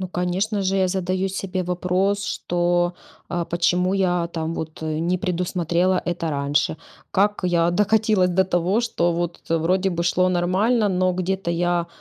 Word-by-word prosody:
Ну, 185 - -4
конечно 185 +4 -1
же, 190 +1 0
я 190 -1 +2
задаю 185 +1 -1
себе 190 -1 -3
вопрос, 185 +3 0
что, 175 -1 0 0.4
э, 175 -1 -1
почему 180 +2 +1
я 180 -3 +1
там 165 0 -3
вот, 160 0 -6
э, 155 -1 -2
не 175 +2 0
предусмотрела 180 0 0
это 175 -2 -2
раньше? 145 +2 0 0.3
Как 205 +1 +1
я 170 -1 +2
докатилась 210 -1 +2
до 190 +2 +3
того, 185 +4 +1
что, 175 -7 0
вот, 175 0 -3
вроде 180 +4 +2
бы 170 -1 -2
шло 180 +1 +2
нормально, 195 +6 +2
но 185 0 +1
где-то 185 0 -2
я 175 0 0
180 Hz, 160 wpm, -22 LUFS, 175-190 Hz, 0.4 s, до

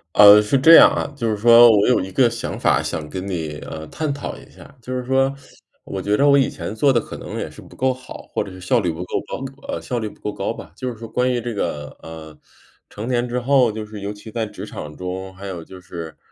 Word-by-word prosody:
呃， 105 0 +9
是 105 +6 +1
这 160 +5 +7
样 - - +9
啊， - - -2
就 115 -5 -2
是 105 - -1
说 120 +2 +8
我 105 -2 +4
有 125 - +4
一 95 +1 -6
个 125 +5 +4
想 115 0 -5
法 - - +3
想 75 - -4
跟 95 0 -5
你， 80 -6 -4
呃， 80 0 -7
探 155 -2 -3
讨 140 0 -5
一 - - -15
下。 140 - -16
就 125 +2 -4
是 125 - -3
说 135 +1 +2 0.5
我 95 - -5
觉 105 +2 +1
着 140 - +4
我 140 - +6
以 135 - +3
前 - - -6
做 140 +5 +3
得 120 - +3
可 - - -8
能 - - -7
也 - - -4
是 - - -13
不 - - -15
够 130 0 +1
好， 130 0 -11
或 - - 0
者 95 - -10
是 95 - -11
效 90 - +1
率 85 - 0
不 80 +2 -6
够 90 - -3
高 - - -5 0.2
呃， - - -3
效 125 - -3
率 110 -2 -3
不 - - -18
够 105 - -4
高 - - -2
吧， - - -9
就 130 - -4
是 120 - -7
说 115 +1 -8
关 125 +3 0
于 125 - 0
这 120 0 -4
个， 75 -7 -4
呃， 80 -1 -10 0.5
成 105 +3 -7
年 125 -1 0
之 125 +1 -1
后， 125 -2 +3
就 110 0 -6
是 105 -1 -9
尤 100 +1 -4
其 105 +2 -11
在 115 -1 -2
职 105 - -8
场 75 0 -8
中， 95 +1 -5
还 100 - -10
有 90 -4 -6
就 95 +3 -12
是， 85 -3 -9
110 Hz, 290 characters per minute, -21 LUFS, 95-125 Hz, 0.5 s, 呃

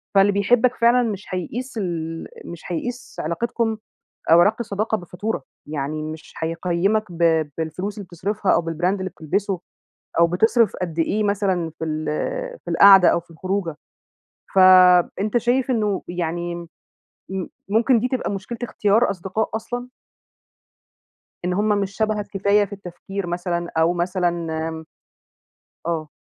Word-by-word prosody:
فاللي 195 +1 +6
بيحبك 235 +5 +3
فعلًا 235 +2 +4
مش 205 -1 -5
هيقيس 230 +8 -4
ال 165 -4 -3 0.2
مش 170 -1 -9
هيقيس 245 +8 -5
علاقتكم 225 +6 -1 0.5
أو 170 +1 +8
علاقة 210 +6 +3
الصداقة 215 0 -1
بفاتورة، 180 -1 -4 0.2
يعني 150 +1 -3
مش 155 +1 -8
هيقيّمك 175 +6 0
ب 165 -2 +2
بالفلوس 180 +6 -4
اللي 200 - -7
بتصرفها، 195 +4 -1
أو - - +2
بالbrand 165 +1 -4
اللي 185 -1 -4
بتلبسه، 185 +3 -2 0.6
أو 170 - +6
بتصرف 225 +4 +3
قد 170 -2 -3
إيه 210 +6 +1
مثلًا 190 -5 0
في 160 - -2
ال 155 0 -3 0.6
في - - -4
القعدة 195 -2 +8
أو - - +2
في 170 0 -19
الخروجة، 185 -1 -3 0.8
فأنت 185 +3 +6
شايف 250 +3 +1
إنّه 210 -5 0
يعني 175 0 -3 0.8
م 190 -2 -3 0.2
ممكن 230 +3 +3
دي 250 - 0
تبقى 255 -4 -2
مشكلة 200 +4 -5
اختيار 220 0 +2
أصدقاء 190 +4 -2
أصلًا؟ 245 +2 -5 1.6
إن 180 - 0
هم 205 +3 +1
مش 200 -1 0
شبهك 215 -2 0
كفاية 200 +1 +2
في 200 - -12
التفكير 195 0 -6
مثلًا، 175 0 -2
أو 165 +2 +4
مثلًا 175 -2 -1 1.3
آه. 160 -3 -2
190 Hz, 135 wpm, -22 LUFS, 170-215 Hz, 1.6 s, أو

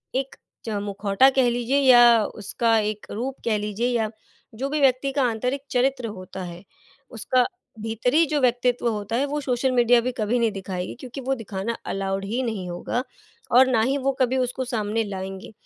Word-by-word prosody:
एक 270 +1 -2 0.3
च - - -4
मुखौटा 205 +4 +3
कह 255 -2 +4
लीजिए 245 +3 0
या 240 -4 +7
उसका 220 +3 0
एक 210 0 -3
रूप 260 +5 -3
कह 220 -2 +2
लीजिए 210 +3 -2
या 230 -3 0 0.5
जो 265 +5 -2
भी 300 +1 -1
व्यक्ति 270 +1 +3
का 275 - +1
आंतरिक 250 +5 -2
चरित्र 255 -1 +1
होता 190 -2 -8
है, 175 +1 -8 0.5
उसका 250 +2 +1 0.4
भीतरी 245 +8 +2
जो 300 -1 0
व्यक्तित्व 245 0 +1
होता 215 0 -3
है 270 - +1
वो 290 +1 -2
सोशल 260 -1 0
मीडिया 240 -1 +4
भी 255 - -2
कभी 220 +3 0
नहीं 230 -2 +2
दिखाएगी। 185 -2 -5
क्योंकि 260 +1 -8
वो 265 +1 -1
दिखाना 225 -1 -4
अलाउड 195 0 -2
ही 230 +6 -2
नहीं 205 -6 -3
होगा 175 +8 -3 0.5
और 260 0 +7
ना 235 -4 +2
ही 265 +5 +1
वो 275 0 0
कभी 255 +1 +2
उसको 255 0 -1
सामने 225 -2 -1
लाएँगे। 195 0 -6
235 Hz, 185 wpm, -24 LUFS, 210-255 Hz, 0.5 s, या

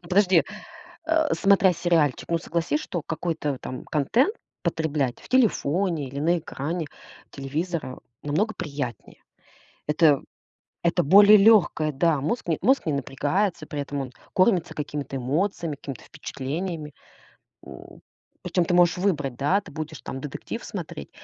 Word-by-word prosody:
Ну, 170 - -14
подожди! 185 -3 +4 0.6
А, 320 -2 +2
смотря 195 -2 +4
сериальчик, 165 -5 +1
ну, 170 - +1
согласись, 170 - -1
что 175 - -4
какой-то, 160 -1 -3
э, 130 - -10
там 130 - -7
контент 230 - +1 0.3
потреблять 145 -6 -1
в - - -15
телефоне 180 - +1
или 140 +2 -6
на 170 +3 +2
экране 160 +1 -4 0.4
телевизора 145 +1 -4 0.2
намного 195 +10 0
приятнее. 140 - -6 0.6
Это 150 -2 +4 0.6
это 175 +1 +3
более 205 +7 +8
лёгкое, 195 -7 +4
да, 150 +1 +2
мозг 175 - -2
не 160 - +1
мозг 265 -4 +3
не 155 - 0
напрягается, 150 +6 -1
при 150 -2 -6
этом 140 0 -3
он 130 -2 -6 0.2
кормится 185 -3 +2
какими-то 145 -2 -5
эмоциями, 155 +5 -1
какими-то 135 -3 -8
впечатлениями. 150 +2 -5 0.7
М, - - -12 0.4
причём 180 - +1
ты 175 - 0
можешь 175 0 +4
выбрать, 145 -10 0
да, 165 +10 +2
ты 185 - -14
будешь 155 0 -6
там 135 - -6
детектив 145 -1 -6
смотреть 70 - -7
160 Hz, 140 wpm, -25 LUFS, 145-185 Hz, 0.7 s, более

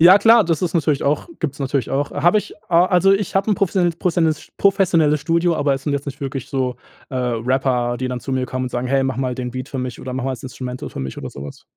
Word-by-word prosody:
Ja 175 +4 +9
klar, 225 -1 +6
das 165 0 0
ist 175 -1 -1
natürlich 150 -4 +1
auch 145 - 0
gibt's 150 -3 -3
natürlich 135 -1 -1
auch. 140 +1 -1
Habe 175 +8 +3
ich, - - -7
a 175 +1 +5
also, 185 +1 +4
ich 195 -1 -1
hab 195 +3 +1
'n 205 - +2
professionelles 175 -3 +1
prossionelles 165 -3 0
professionelles 170 -7 +3
Studio, 170 +2 +1
aber 140 -1 +2
es 135 - -6
sind 145 - -1
jetzt 140 0 -2
nicht 140 +1 -6
wirklich 135 -2 -4
so, 130 -3 -1 0.3
äh, 130 - -4
Rapper, 125 0 0
die 130 - -3
dann 125 -1 -3
zu 135 - -7
mir 130 -1 0
kommen 130 0 -3
und - - -3
sagen: 120 +1 -2
„Hey, 135 +1 +2
mache 130 -1 -2
mal 125 -1 -1
den 125 -1 -4
Beat 130 +2 -6
für 135 - -5
mich 125 -2 -4
oder 130 - -6
mache 130 0 -3
mal 135 - 0
das 125 - -8
Instrumental 125 -1 -6
für - - -7
mich“ 65 0 -5
oder - - -6
sowas. 70 +1 -9
140 Hz, 265 wpm, -20 LUFS, 130-170 Hz, 0.3 s, Ja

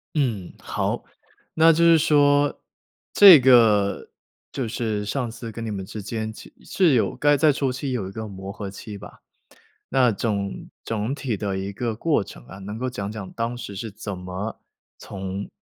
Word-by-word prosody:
嗯， 115 - -1
好。 - - -3 0.5
那 165 +1 +6
就 165 +1 +2
是 165 -1 +7
说， 145 -2 +3 0.5
这 195 -6 +10
个 115 -6 +4 0.4
就 130 - -3
是 110 -2 -2
上 120 +3 -2
次 115 -1 -8
跟 115 +1 -6
你 110 - -4
们 100 -2 -4
之 105 +3 -7
间 110 +1 -4
其 - - -13
是 175 -7 +2
有 115 - +1
该 145 0 +3
在 150 +1 +4
初 135 -1 -1
期 135 +1 -4
有 110 -7 -3
一 - - -8
个 110 +2 -6
磨 95 -1 -8
合 100 -2 -6
期 100 +1 -9
吧。 100 - -12 0.7
那 130 -2 +4
总 100 -2 -3 0.2
总 115 +3 -2
体 130 -6 -3
的 100 -2 -3
一 95 +1 -4
个 115 +2 -3
过 155 +2 +1
程 - - -13
啊， 95 - -11
能 105 +3 -7
够 130 +2 -2
讲 100 -5 -5
讲 105 -3 -7
当 115 +1 -3
时 100 -5 -8
是 110 +3 -5
怎 100 -1 -7
么 90 +4 -6 0.4
从 95 0 -6
110 Hz, 195 characters per minute, -23 LUFS, 100-130 Hz, 0.7 s, 这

